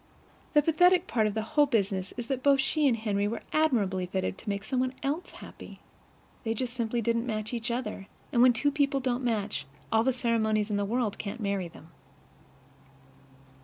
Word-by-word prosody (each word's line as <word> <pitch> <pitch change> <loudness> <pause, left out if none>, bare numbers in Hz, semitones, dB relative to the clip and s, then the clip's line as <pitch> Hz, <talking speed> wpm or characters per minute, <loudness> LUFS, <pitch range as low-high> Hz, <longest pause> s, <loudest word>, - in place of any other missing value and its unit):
The 295 -1 +5
pathetic 355 +3 +4
part 220 - +1
of 210 - -3
the 220 - -1
whole 290 +6 +3
business 195 -6 0
is 240 - -3
that 260 +1 -2
both 275 0 +4
she 290 +2 +2
and 240 -4 +2
Henry 205 -2 0
were 225 +2 -4
admirably 205 -12 +1
fitted 190 +1 -2
to 220 - -6
make 200 0 -2
some 250 +4 -1
one 255 0 -1
else 300 +6 -2
happy. - - -12 0.6
They 225 -1 -1
just 245 +1 -3
simply 235 -1 -1
didn't 230 +2 0
match 215 0 -3
each 235 0 -3
other; 235 -5 -3 0.3
and 235 - +4
when 250 0 +8
two 265 +5 +1
people 280 -1 +1
don't 255 -1 -1
match, 210 - -1 0.2
all 225 0 +4
the 265 - +3
ceremonies 220 -4 0
in 205 - +1
the 205 - 0
world 225 0 -1
can't 210 +3 -5
marry 200 -4 -1
them. 165 0 -15
230 Hz, 195 wpm, -28 LUFS, 210-260 Hz, 0.6 s, when